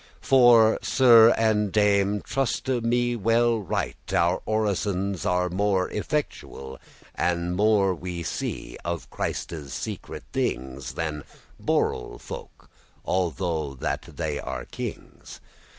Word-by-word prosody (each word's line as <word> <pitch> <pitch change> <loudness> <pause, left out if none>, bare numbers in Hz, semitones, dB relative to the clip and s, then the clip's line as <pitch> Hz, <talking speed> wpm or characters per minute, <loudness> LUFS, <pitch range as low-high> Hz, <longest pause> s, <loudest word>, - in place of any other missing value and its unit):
For, 120 -4 +6
Sir 115 -3 +7
and 105 -3 +2
Dame, 100 -1 +2
truste 130 -1 -1
me 120 +1 +1
right 115 -2 +1
well, - - +2
Our 90 +2 +1
orisons 100 -3 -1
be 90 0 +1
more 95 -2 +1
effectuel, 105 - -4 0.3
And 85 +1 -1
more 100 -1 +3
we 90 -1 -5
see - - -4
of 85 0 -4
Christe's 75 -6 -4
secret - - -6
things, 65 +1 -3
Than 75 -2 -3 0.4
*borel - - -1
folk,* - - -10 0.3
although 85 -5 -1
that 65 - -2 0.2
they 75 -3 -2
be - - -5
kings. - - -8
100 Hz, 110 wpm, -25 LUFS, 85-110 Hz, 0.4 s, Sir